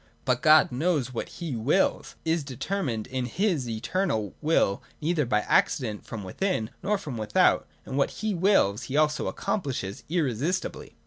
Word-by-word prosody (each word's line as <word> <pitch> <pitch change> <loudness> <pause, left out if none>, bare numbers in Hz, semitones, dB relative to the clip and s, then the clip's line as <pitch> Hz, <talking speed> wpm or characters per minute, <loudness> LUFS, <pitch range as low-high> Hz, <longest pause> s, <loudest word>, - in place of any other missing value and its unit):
But 125 -2 +1
God 155 0 +6
knows 135 -2 0
what 115 - -4
he 165 -7 -5
wills, 135 - +1
is 160 -1 +1
determined 135 - -3
in 130 -1 -3
his 165 - 0
eternal 110 - -1
will 150 -10 +2 0.2
neither 155 -3 0
by 105 -3 +2
accident 110 -1 +1
from 110 -3 -6
within 110 - -2
nor 205 +3 +1
from 150 -11 -6
without, 105 -7 +3 0.2
and 135 - -3
what 140 - +3
he 215 -1 -3
wills 165 - +3
he 140 - -1
also 150 0 +2
accomplishes, 125 - -3
irresistibly. 160 - -1
140 Hz, 150 wpm, -27 LUFS, 115-175 Hz, 0.2 s, God